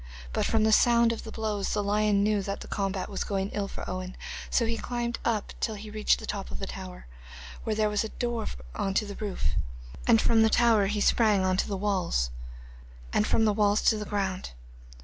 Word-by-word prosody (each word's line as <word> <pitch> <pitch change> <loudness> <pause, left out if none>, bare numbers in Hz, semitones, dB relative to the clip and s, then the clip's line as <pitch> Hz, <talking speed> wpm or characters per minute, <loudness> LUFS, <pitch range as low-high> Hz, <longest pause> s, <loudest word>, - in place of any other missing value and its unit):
But - - +1
from 225 -1 +2
the 220 - +4
sound 235 +1 +5
of 230 - -6
the 220 - -7
blows 215 -3 -2
the 205 - 0
lion 205 0 +2
knew 210 -1 +2
that 200 +1 -4
the - - -8
combat 195 -2 -2
was 195 - -3
going 195 -1 -2
ill 200 -1 -2
for - - -7
Owen, 185 0 -5 0.3
so 235 - +2
he 230 0 0
climbed 240 +1 -3
up 220 -3 -1
till 220 - -1
he 210 +1 -9
reached 215 0 +2
the - - -8
top - - -4
of 65 - -5
the - - -4
tower, - - -8 0.6
where 220 - 0
there 215 0 +2
was 210 0 0
a 220 - -4
door 240 -1 -2 0.3
on 195 -1 -2
to 215 - +2
the 205 - -6
roof, 195 - -1 0.6
and 230 -2 +6
from 225 0 +4
the 220 - +5
tower 225 -4 +4
he 210 +1 -1
sprang 210 -3 +4
on 185 0 +2
to - - +1
the 200 - -2
walls, 185 - 0 0.8
and 105 - +2
from 225 - +3
the 210 - +3
walls 205 0 +2
to 220 - +4
the 210 - -4
ground. 190 - -2
210 Hz, 225 wpm, -28 LUFS, 195-220 Hz, 0.8 s, and